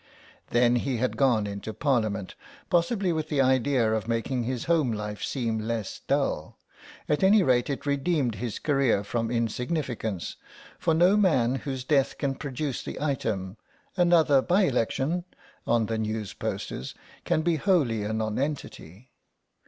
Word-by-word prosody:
Then 120 0 +3
he 130 0 -1
had 125 +3 -1
gone 120 -6 +3
into 100 +2 -6
Parliament, 110 -8 0 0.4
possibly 180 +1 +2
with 155 -1 -3
the 145 - 0
idea 130 -3 +3
of 110 0 -2
making 115 +1 -1
his 125 -1 -2
home 160 -7 +2
life 105 -1 -4
seem 115 -4 -1
less 110 -1 -3
dull; - - -1 0.5
at 150 - +1
any 195 +1 +6
rate 125 -2 +2
it 140 - -3
redeemed 140 -3 +1
his 115 +1 -4
career 135 -8 +1
from 115 +2 -2
insignificance, 120 - -2 0.4
for 165 - +2
no 180 +5 +5
man 155 - +3
whose 135 -2 -4
death 135 0 +1
can 140 -1 -1
produce 140 0 -4
the - - -6
item 110 -9 -2 0.4
"another 170 -6 +4
by 180 +8 +3
election" 140 +4 0 0.4
on 115 -1 +3
the 110 0 -2
news 110 -2 -3
posters 65 - -5 0.3
can 155 - +1
be 165 -1 +2
wholly 145 - +2
a 105 - -2
nonentity. 110 - -4
130 Hz, 145 wpm, -27 LUFS, 110-150 Hz, 0.5 s, any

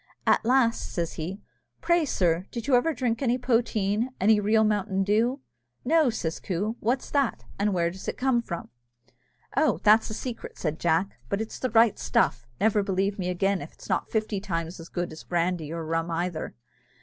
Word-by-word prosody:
At - - +4
last 235 -1 +2
says 170 -2 -2
he, 180 +6 -5 0.4
"Pray, 345 -2 +2
sir, 180 - +1
did 235 -2 -5
you 280 - 0
ever 250 +6 +4
drink 245 -5 -1
any 250 -2 +2
poteen? 230 -2 +1
any 210 +2 +5
real 215 +2 +3
mountain 205 -2 +1
dew?" 230 +7 +1 0.4
"No," 315 0 +4
says 170 -8 -3
Coo; 205 +5 -2
"what's 245 +4 -1
that, 280 -4 +1 0.2
and 205 +1 +2
where 170 -2 +1
does 190 +2 -10
it - - -3
come 255 -2 +2
from?" 170 -7 -6 0.9
"Oh, 310 - +3
that's 215 +1 +5
a 215 - -4
secret," 245 0 -6
said 155 -1 -2
Jack, 170 -1 0
"but 200 - 0
it's 220 0 -5
the 255 - -1
right 225 -1 +4
stuff 120 -1 +1
never 215 -1 +3
believe 195 0 -1
me 180 -1 -1
again, 195 +1 +1
if 145 - -10
'tis - - -13
not - - 0
fifty 215 -2 -1
times 170 -3 -4
as 165 - -10
good 175 -1 -3
as 155 - -10
brandy 170 -3 -1
or 165 -1 -4
rum 165 +1 -1
either. 170 -1 -3
205 Hz, 190 wpm, -27 LUFS, 175-235 Hz, 0.9 s, any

